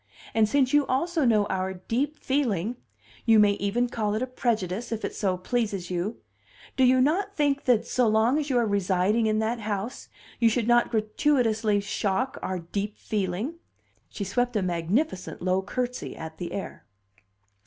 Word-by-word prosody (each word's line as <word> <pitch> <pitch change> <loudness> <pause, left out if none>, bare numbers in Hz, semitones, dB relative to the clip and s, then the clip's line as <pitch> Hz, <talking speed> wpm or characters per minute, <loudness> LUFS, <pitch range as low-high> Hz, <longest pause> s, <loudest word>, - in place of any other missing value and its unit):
And 220 -1 +3
since 265 +1 +2
you 290 -1 +4
also 320 +3 +1
know 215 -4 +4
our 190 0 -2
deep 260 +11 -2
feeling 240 - -1 0.5
you 225 -2 +5
may 210 -1 +6
even 200 +5 0
call 215 -3 -1
it 220 - -1
a - - +1
prejudice, 230 -4 -2
if 225 -1 -2
it - - -4
so 190 -3 0
pleases 200 -3 -2
you 180 +5 -2 0.6
do 260 - +3
you 255 0 +5
not 365 +10 +1
think 285 -3 +1
that, 245 -4 +3
so 250 -2 +1
long 220 +6 +3
as 295 -1 -3
you 255 - +2
are 240 - +3
residing 200 +2 +1
in 215 0 +1
that 220 +2 0
house, 210 +2 -4 0.3
you 230 - +5
should 230 0 0
not 240 0 +4
gratuitously 220 -2 +1
shock 200 +5 -1
our 185 - -2
deep 200 +5 -4
feeling?" 210 - -3 0.5
She 205 - -5
swept 245 +5 -1
a 205 - +1
magnificent 185 - -1
low 185 +1 +1
curtsy 250 +5 -4
at 160 0 -8
the 175 -2 -4
air. 195 - -6
220 Hz, 175 wpm, -26 LUFS, 200-250 Hz, 0.6 s, may